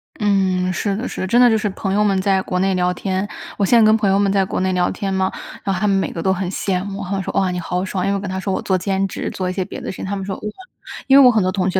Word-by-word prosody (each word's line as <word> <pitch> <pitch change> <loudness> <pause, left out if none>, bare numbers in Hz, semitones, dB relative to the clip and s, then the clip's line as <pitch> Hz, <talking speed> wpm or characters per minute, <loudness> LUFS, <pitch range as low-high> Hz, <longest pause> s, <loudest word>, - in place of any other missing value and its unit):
嗯， 190 -4 +1
是 200 +2 -1
的， 225 +5 -3
是 - - -6
的。 185 - -2
真 235 +6 +3
的 250 - +7
就 220 - +3
是 210 - -1
朋 195 0 -3
友 210 +1 +3
们 195 -2 +2
在 190 0 +2
国 180 - -3
内 190 +1 +2
聊 180 0 +1
天 190 +2 -2 0.3
我 205 - 0
现 235 +4 +5
在 220 - +6
跟 215 0 +5
朋 210 -3 +1
友 195 - +3
们 200 -1 +2
在 195 -1 +2
国 190 - -3
内 185 0 +1
聊 180 -1 +1
天 195 -1 -3
嘛， 190 0 0 0.3
然 195 - 0
后 180 - -2
他 210 - +1
们 200 - +3
每 195 - 0
个 165 - -5
都 190 - +2
很 190 -1 -3
羡 185 -1 -1
慕， 200 0 -5
他 185 - -7
们 195 -1 -1
说： - - -4
“哇， 190 -2 +1
你 180 - -3
好 180 +2 -2
爽。” 185 -1 -3
因 195 - 0
为 - - +1
我 - - -1
跟 200 - -5
他 190 0 -3
说 195 +1 -3
我 - - -1
做 190 - 0
兼 195 +1 -1
职， - - -4
做 185 - -3
一 - - -3
些 190 - -1
别 185 - -8
的 - - -5
事 190 - -10
情， - - -5
他 200 +1 -3
们 195 -1 -5
说： 195 -1 -4
“哇。” - - -15 0.7
因 270 - +7
为 - - +8
我 - - +9
很 220 -5 +2
多 185 - +1
同 185 -1 0
学 190 - 0
195 Hz, 380 characters per minute, -19 LUFS, 185-200 Hz, 0.7 s, 我